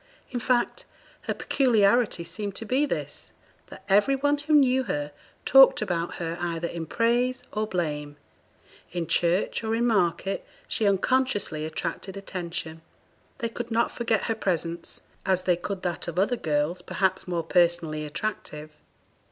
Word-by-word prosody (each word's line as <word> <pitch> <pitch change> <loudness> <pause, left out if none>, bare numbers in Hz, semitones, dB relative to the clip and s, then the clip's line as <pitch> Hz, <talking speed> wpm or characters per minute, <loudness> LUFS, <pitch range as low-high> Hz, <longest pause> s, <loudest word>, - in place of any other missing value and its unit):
In 245 - -2
fact, 240 0 0 0.4
her - - +1
peculiarity 230 -6 +3
seemed 190 +4 -5
to 225 - -5
be 270 +6 +2
this - - -5 0.4
that - - -12
every 205 +7 +4
one 285 +2 +1
who 300 +2 -1
knew 265 -3 +5
her 145 -7 -2 0.3
talked 270 0 +8
about 175 -5 -2
her 170 0 -4
either 170 -1 -2
in 165 -1 -5
praise 245 +4 +1
or 215 0 -1
blame; 150 -6 -3 0.7
in 175 -1 -2
church, 175 +7 +1
or 220 0 0
in 235 +1 +1
market, 195 -3 +1 0.2
she 215 - 0
unconsciously 200 -6 +1
attracted 170 +4 -4
attention; 170 -4 -5 0.6
they 235 -3 -2
could 240 +1 -6
not 230 0 +1
forget 230 -3 0
her 225 - 0
presence, 170 -5 -2 0.2
as 185 -2 +1
they 180 -1 +3
could 185 +2 -5
that 175 -1 -2
of 170 0 -5
other 205 +6 +2
girls 155 -1 -1
perhaps 190 +1 0
more 170 -2 -1
personally 170 -3 +2
attractive. 155 -2 -5
190 Hz, 150 wpm, -26 LUFS, 170-235 Hz, 0.7 s, talked